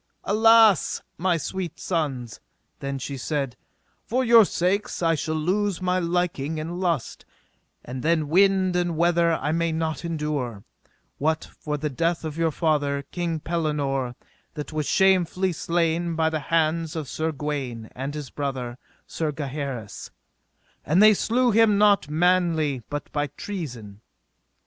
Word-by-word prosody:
Alas, 220 -2 +5 0.2
my 175 -1 +2
sweet 175 +2 -5
sons, 135 - -3 0.4
then 140 0 -3
she 135 +1 -5
said, 135 -1 -2 0.5
for 255 +3 0
your 230 -3 +7
sakes 185 +1 -1
I 165 0 +3
shall 155 0 -2
lose 190 +4 0
my 185 0 +1
liking 170 -4 -1
and 170 +3 -5
lust, 170 -8 -2 0.6
and 125 +1 -6
then 160 0 +1
wind 190 +2 +3
and 175 -2 0
weather 170 0 +3
I 150 -2 -1
may 165 +1 0
not 160 0 -2
endure, 150 -10 -3 0.6
what 155 +2 +1 0.2
for 150 -1 -3
the 150 0 -3
death 165 +4 -1
of 155 -2 -4
your 165 0 +1
father, 145 -3 0
King 170 -3 -2
Pellinore, 145 -7 -1 0.4
that 150 0 -6
was 155 -2 -2
shamefully 190 -1 +3
slain 170 0 0
by 160 0 +1
the 155 - -1
hands 165 0 +1
of 155 -4 -4
Sir 160 +4 -2
Gawaine, 135 -6 -4
and 135 +3 -4
his 150 -3 -6
brother, 130 -4 -4 0.3
Sir 160 -2 -2
Gaheris: 140 - -5 0.7
and 160 +7 +2
they 215 0 +8
slew 240 +4 +2
him 220 -1 +4
not 205 -6 +4
manly 160 -4 +2
but 145 0 -5
by 145 0 -1
treason. 120 - -6
160 Hz, 145 wpm, -24 LUFS, 145-180 Hz, 0.7 s, they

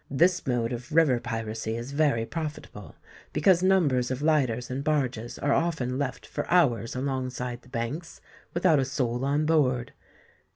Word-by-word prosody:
This 175 +5 +2
mode 120 -2 0
of 120 0 -7
river 150 -6 +4
piracy 115 -1 -4
is 120 +3 -6
very 140 -6 +2
profitable, 150 - -6 0.4
because 180 +2 +4
numbers 155 -10 +3
of 130 +2 -3
lighters 130 -6 +1
and 135 +2 -3
barges 130 -6 -1
are 145 0 +1
often 140 -7 0
left 140 -3 -3
for - - -5
hours 125 -10 +2
alongside 125 -2 -3
the 125 - -19
banks, 130 +7 -4 0.3
without 170 -3 +3
a 135 - +1
soul 125 -2 -1
on 145 +3 +1
board. 130 -6 +1
130 Hz, 155 wpm, -27 LUFS, 120-155 Hz, 0.4 s, river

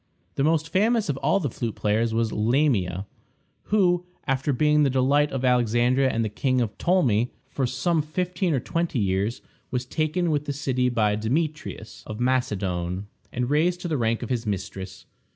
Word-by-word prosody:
The 135 - 0
most 160 +1 +2
famous 215 +1 +2
of 140 - 0
all 155 +8 +2
the 170 - -1
flute 115 -2 -4
players 110 +2 +1
was 115 0 0
Lamia, 105 - +1 0.6
who, 180 -4 +2 0.2
after 135 +1 0
being 150 +3 +3
the 145 - +4
delight 135 +3 +2
of 130 -1 -2
Alexandria 125 +2 +3
and 115 -2 0
of 105 - -4
King 130 -3 +1
Ptolemy 125 - +2 0.2
for 135 -1 -1
some 155 +6 +1
fifteen 175 +2 -1
or - - +1
twenty 170 +2 -2
years, 100 +2 0 0.3
was 125 -1 -2
taken 160 +5 0
with 150 -1 0
the 145 - -2
city 130 -3 0
by 110 -4 +2
Demetrius 140 +1 -3
of 110 - -6
Macedon, 100 -7 -1 0.2
and 125 +2 -2
raised 175 +4 +2
to 175 - -3
the 160 - -1
rank 115 -2 0
of 120 - -6
his 120 -2 0
mistress. 95 -1 -5
130 Hz, 170 wpm, -25 LUFS, 115-155 Hz, 0.6 s, the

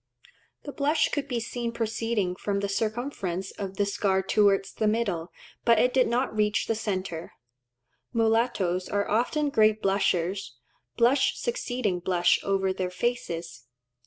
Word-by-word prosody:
The 285 - -6
blush 295 +3 +1
could 285 -1 -2
be 245 -4 -1
seen 235 +1 -3
proceeding 225 -4 -1
from 200 +1 -2
the 200 - -1
circumference 200 -3 -2
of 195 -2 -6
the 205 - +2
scar 195 -1 +1
towards 195 0 +2
the 215 - 0
middle, 200 -7 -1 0.3
but 235 -1 +5
it 250 +3 +3
did 260 -1 +4
not 240 0 0
reach 210 -1 +1
the - - 0
centre. 190 -6 -4 0.8
Mulattoes 225 -6 +1
are 200 0 0
often 280 +7 +1
great 215 -3 +4
blushers, 190 -6 0 0.4
blush 255 +4 +3
succeeding 245 - -2
blush 175 0 +2
over 195 -1 0
their 185 -1 -2
faces. 170 - -3
210 Hz, 140 wpm, -27 LUFS, 190-235 Hz, 0.8 s, but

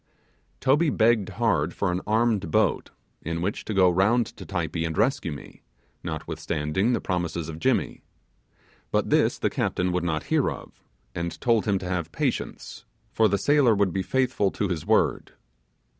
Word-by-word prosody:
Toby 150 +5 +3
begged 110 -5 +2
hard 105 -9 0
for 100 -3 0
an 90 +1 -2
armed 110 -2 +1
boat, 110 -5 +1 0.3
in 85 +1 -3
which 95 +5 -2
to - - -4
go 95 -1 +5
round 100 +7 +3
to - - -11
Typee 85 -3 -2
and 80 -1 -3
rescue 120 - +1
me, 75 - -10 0.4
notwithstanding 80 +5 -2
the - - +1
promises 85 -3 -2
of 80 0 -7
Jimmy. - - 0 0.9
But - - 0
this - - +3
the - - -1
captain 90 0 -1
would 90 -1 -1
not 80 -3 -1
hear - - +1
of, - - -10 0.3
and 85 0 -4
told 115 -3 +2
him 100 -2 +2
to 95 - -6
have 85 -3 -3
patience, - - -3 0.3
for 110 - +3
the 100 0 +1
sailor 140 -3 +3
would 100 -3 +1
be 95 - 0
faithful 130 -1 +1
to 100 - -2
his 85 -4 -4
word. - - +1
95 Hz, 170 wpm, -25 LUFS, 85-110 Hz, 0.9 s, go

